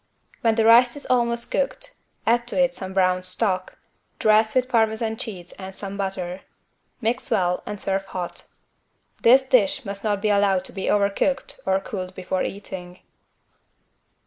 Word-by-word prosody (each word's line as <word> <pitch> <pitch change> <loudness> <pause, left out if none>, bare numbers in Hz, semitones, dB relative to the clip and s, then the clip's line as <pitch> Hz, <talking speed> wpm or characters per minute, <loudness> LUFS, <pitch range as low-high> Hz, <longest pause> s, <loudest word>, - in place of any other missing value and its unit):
When 225 -1 +3
the 225 -1 +2
rice 240 +3 +6
is 285 - -9
almost 235 -1 +1
cooked, - - -2 0.3
add 240 +1 +2
to 245 - -2
it 265 -1 +3
some 190 -6 -5
brown 185 -1 +3
stock. 185 0 -2 0.4
Dress 215 +1 +3
with 255 0 +3
parmesan 220 -2 +1
cheese 185 -6 -6
and 190 0 -8
some 195 0 -6
butter. 190 -2 -4 0.6
Mix 245 +3 0
well 180 -5 +1
and 205 - -5
serve 195 0 -1
hot. 180 -2 -6 0.7
This 260 +3 +6
dish 255 -1 +2
must 200 0 -5
not 205 -2 0
be 210 +1 0
allowed 200 -2 +2
to - - -7
be 190 - -4
overcooked 205 +7 0
or 190 0 +3
cooled 185 -2 -6
before 185 0 -2
eating. 185 -3 -6
205 Hz, 155 wpm, -23 LUFS, 190-235 Hz, 0.7 s, rice